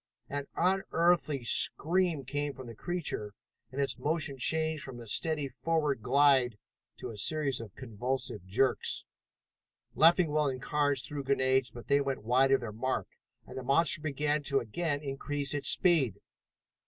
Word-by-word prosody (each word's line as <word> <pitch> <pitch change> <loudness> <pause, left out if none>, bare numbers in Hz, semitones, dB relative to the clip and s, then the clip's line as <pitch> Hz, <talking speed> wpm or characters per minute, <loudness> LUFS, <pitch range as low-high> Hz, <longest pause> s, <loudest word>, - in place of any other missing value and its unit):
An 140 0 -4
unearthly 170 -6 +1
scream 165 - +3
came 145 +1 -3
from 130 - -9
the 115 - -9
creature, 115 - -4 0.4
and 135 - -6
its 135 -3 -1
motion 150 0 -1
changed 160 +2 +1
from 130 -3 -8
a 120 - -9
steady 150 +5 0
forward 145 -1 -1
glide 130 -2 +3 0.4
to - - -6
a - - -9
series 140 +1 -1
of 105 -4 -11
convulsive 125 -2 -4
jerks. 125 +6 0 0.9
Leffingwell 160 -3 +4
and 130 -1 -4
Carnes 145 -1 0
threw 145 -1 -4
grenades, 130 -1 +1
but 120 - -11
they 140 0 +3
went 135 -5 -3
wide 130 +4 +3
of 135 - +4
their 115 -3 -5
mark, 125 +5 -3 0.4
and - - -11
the 130 - -5
monster 155 +5 +3
began 150 0 -1
to 140 -1 +1
again 145 +5 -3
increase 140 0 -3
its 145 - +1
speed. 160 - +2
140 Hz, 155 wpm, -30 LUFS, 130-155 Hz, 0.9 s, Leffingwell